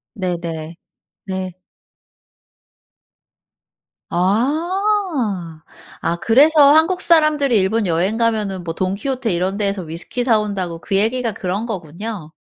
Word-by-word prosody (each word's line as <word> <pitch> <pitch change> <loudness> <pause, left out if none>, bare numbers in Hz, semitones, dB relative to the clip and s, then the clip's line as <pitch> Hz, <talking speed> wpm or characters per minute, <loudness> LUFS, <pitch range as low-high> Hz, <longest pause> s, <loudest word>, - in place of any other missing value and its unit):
네네. 170 -4 -4 0.5
네. 185 -2 -4 2.6
아. 260 - 0 0.4
아 170 - 0
그래서 285 - +5
한국 340 +4 +3
사람들이 305 -8 +3
일본 205 +2 +1
여행 180 +6 +1
가면은 210 -5 0
뭐 165 -1 -4
돈키호테 220 +6 -2
이런 185 +3 -1
데에서 200 -2 -1
위스키 170 +9 -4
사 230 -4 +4
온다고 190 -5 -3
그 195 - -2
얘기가 230 +3 +1
그런 195 +3 -3
거군요. 180 -3 -6
205 Hz, 225 characters per minute, -19 LUFS, 180-255 Hz, 2.6 s, 그래서